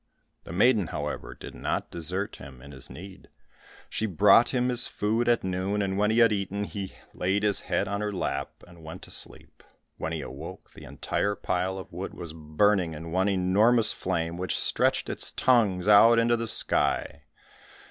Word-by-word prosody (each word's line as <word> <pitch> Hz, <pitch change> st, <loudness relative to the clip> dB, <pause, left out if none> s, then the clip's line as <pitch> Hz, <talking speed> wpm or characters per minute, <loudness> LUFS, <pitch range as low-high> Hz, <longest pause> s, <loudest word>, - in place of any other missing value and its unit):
The -, -, -9 dB
maiden, 105 Hz, +1 st, +3 dB
however, -, -, -5 dB
did -, -, -10 dB
not -, -, -3 dB
desert 90 Hz, +4 st, -2 dB
him 65 Hz, -1 st, -12 dB
in 70 Hz, +3 st, -12 dB
his 65 Hz, -3 st, -10 dB
need. 95 Hz, +1 st, -11 dB, 0.6 s
She 110 Hz, -, -2 dB
brought 105 Hz, +5 st, +5 dB
him 125 Hz, -1 st, 0 dB
his 120 Hz, -1 st, +3 dB
food 115 Hz, +3 st, 0 dB
at 120 Hz, -, +2 dB
noon, 95 Hz, +2 st, -1 dB
and 95 Hz, -1 st, -2 dB
when 105 Hz, +1 st, +2 dB
he 110 Hz, -, +1 dB
had 115 Hz, -2 st, +5 dB
eaten, 100 Hz, 0 st, -2 dB
he 100 Hz, -2 st, -6 dB, 0.2 s
laid 95 Hz, +3 st, 0 dB
his 105 Hz, -2 st, +2 dB
head 100 Hz, -, -1 dB
on 100 Hz, +1 st, -2 dB
her 105 Hz, 0 st, -2 dB
lap, 70 Hz, -7 st, -4 dB
and 85 Hz, -2 st, -16 dB
went 80 Hz, +1 st, -9 dB
to -, -, -11 dB
sleep. -, -, -5 dB, 0.4 s
When -, -, -4 dB
he -, -, -3 dB
awoke, -, -, -9 dB
the -, -, -12 dB
entire 105 Hz, 0 st, -2 dB
pile 90 Hz, 0 st, -2 dB
of 95 Hz, -, -9 dB
wood 90 Hz, +3 st, -6 dB
was 85 Hz, -3 st, -8 dB
burning 80 Hz, +3 st, +1 dB
in 80 Hz, +2 st, -8 dB
one 95 Hz, +3 st, +1 dB
enormous 105 Hz, +5 st, +3 dB
flame, 85 Hz, -2 st, -2 dB
which 90 Hz, -1 st, -2 dB
stretched -, -, +1 dB
its -, -, -4 dB
tongues 105 Hz, -7 st, +2 dB
out 115 Hz, +3 st, +7 dB
into 115 Hz, +1 st, +3 dB
the 115 Hz, 0 st, -3 dB
sky. -, -, 0 dB
100 Hz, 185 wpm, -27 LUFS, 90-105 Hz, 0.6 s, out